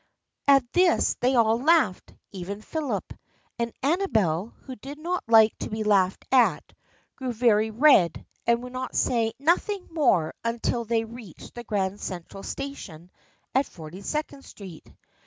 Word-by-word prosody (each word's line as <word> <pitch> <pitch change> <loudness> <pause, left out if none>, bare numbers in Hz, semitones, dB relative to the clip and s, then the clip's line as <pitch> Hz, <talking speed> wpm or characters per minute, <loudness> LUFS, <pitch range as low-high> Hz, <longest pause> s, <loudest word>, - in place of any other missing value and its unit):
At 275 -2 +6
this 360 -2 +3
they 255 +2 +2
all 225 -1 +3
laughed, 295 - +2 0.2
even 200 +2 -7
Philip, 310 +1 -4 0.5
and 235 0 -1
Ama 350 +8 +1
bel, 185 - +1
who 260 - -9
did 275 +6 -9
not 350 +4 -3
like 220 -1 +6
to - - -5
be 215 0 -3
laughed 195 -3 +2
at, 255 -2 +2 0.4
grew 260 -2 -4
very 220 -2 +2
red 225 - +4 0.2
and 235 +1 +2
would 255 +1 -6
say 230 -2 +1
nothing 360 +6 0
more 240 - +2
until 230 0 -1
they 225 0 0
reached 225 -6 -12
the 240 - -8
Grand 200 -3 -2
Central 185 +2 -7
Station 185 - -7 0.4
at 265 +1 +2
Forty 165 +3 -11
Second 285 +3 -4
Street. 185 -6 -12
235 Hz, 145 wpm, -25 LUFS, 200-275 Hz, 0.5 s, At